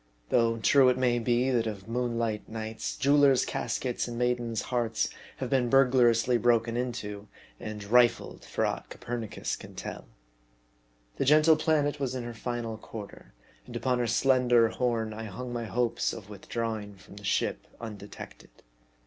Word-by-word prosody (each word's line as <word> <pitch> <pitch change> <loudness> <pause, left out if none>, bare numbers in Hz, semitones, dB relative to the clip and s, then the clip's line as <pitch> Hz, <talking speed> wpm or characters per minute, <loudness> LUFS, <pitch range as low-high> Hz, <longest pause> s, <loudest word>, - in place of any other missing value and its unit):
Though 115 -1 +3
true 130 +3 +5
it 125 - +1
may 125 -2 +2
be, 120 +2 +1
that 115 -3 +1
of 100 -2 -6
moonlight 115 -2 -2
nights, 110 0 -5
jewelers' 140 -1 +4
caskets 125 -2 -2
and 120 -1 -5
maidens' 120 -2 0
hearts 115 -2 0 0.3
have 130 -1 -4
been 125 -3 +2
burglariously 125 -2 +4
broken 115 -1 +2
into 105 -4 -4 0.3
and 105 -1 -6
rifled, 120 +3 +2
for - - -1
aught - - -3
Copernicus 120 -3 -4
can - - -12
tell. - - -7 1.1
The - - 0
gentle 155 +3 +6
planet 150 -2 +1
was 130 -2 -2
in 125 - -3
her 120 0 -6
final 115 -1 -4
quarter, 100 - -10 0.3
and - - -9
upon 125 -1 0
her 120 - 0
slender 125 -2 +4
horn 115 -2 -1
I 110 +1 -6
hung 120 +5 -6
my 120 -1 -3
hopes 120 +1 0
of 105 -2 -9
withdrawing 105 0 -4
from 100 +1 -15
the 105 - -11
ship - - -1
undetected. 105 -3 -9
120 Hz, 155 wpm, -28 LUFS, 110-125 Hz, 1.1 s, gentle